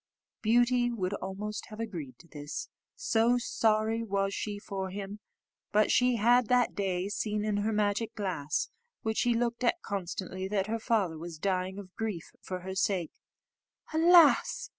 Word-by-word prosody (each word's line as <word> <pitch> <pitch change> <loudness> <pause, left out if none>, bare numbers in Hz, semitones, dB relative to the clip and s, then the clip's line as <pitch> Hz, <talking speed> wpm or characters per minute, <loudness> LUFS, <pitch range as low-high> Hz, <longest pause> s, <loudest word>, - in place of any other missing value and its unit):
Beauty 240 +2 +3
would 200 -5 -2
almost 200 +2 -5
have 215 0 -10
agreed 165 - -5
to 170 - -18
this, 145 -2 -6 0.3
so 235 +2 +2
sorry 225 -1 +1
was 195 -3 -1
she 205 0 -3
for 195 -2 -4
him, 200 +2 -6 0.5
but 210 +1 +3
she 250 0 +4
had 240 +2 +4
that 250 0 +3
day 190 -2 -1
seen 210 +1 -2
in 210 -1 0
her 210 +2 0
magic 210 +1 0
glass, 180 -8 -2 0.3
which 220 0 0
she 240 -1 +2
looked 235 +1 -1
at 250 +8 +2
constantly, 185 -1 -4
that 195 -1 0
her 225 +2 -2
father 200 -8 0
was 170 -1 -7
dying 185 +2 -1
of 190 -2 -9
grief 210 -7 -4
for 185 -1 -5
her 190 +1 -5
sake. 190 -3 0 0.8
"Alas!" 340 - +5
205 Hz, 160 wpm, -30 LUFS, 190-230 Hz, 0.8 s, Alas